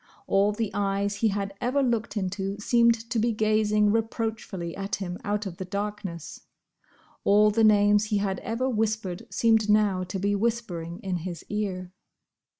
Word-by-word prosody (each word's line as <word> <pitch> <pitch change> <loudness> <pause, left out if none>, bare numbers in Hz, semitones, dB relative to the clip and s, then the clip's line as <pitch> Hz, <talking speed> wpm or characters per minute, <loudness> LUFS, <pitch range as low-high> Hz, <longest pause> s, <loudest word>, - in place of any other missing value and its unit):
All 200 +1 +3
the 210 0 -2
eyes 200 0 -1
he 225 - +2
had 200 -1 -2
ever 260 +3 +1
looked 235 -3 -1
into 195 0 -2
seemed 235 +1 +3
to 230 - +1
be 235 +2 +2
gazing 215 -1 +2
reproachfully 220 -6 -2
at 195 +1 -3
him 180 -3 -5
out 210 +1 -1
of 180 -3 -6
the - - -4
darkness; 200 -4 -5 0.8
all 210 +1 +5
the 225 +2 +2
names 205 0 +5
he 210 -1 0
had 195 -2 -1
ever 230 +4 -2
whispered 215 -6 -2
seemed 220 -2 +3
now 205 -3 +3
to 185 +2 -4
be 200 +2 0
whispering 200 -6 -2
in 185 -2 -2
his 175 0 -6
ear. 190 -4 -3
205 Hz, 160 wpm, -26 LUFS, 195-220 Hz, 0.8 s, all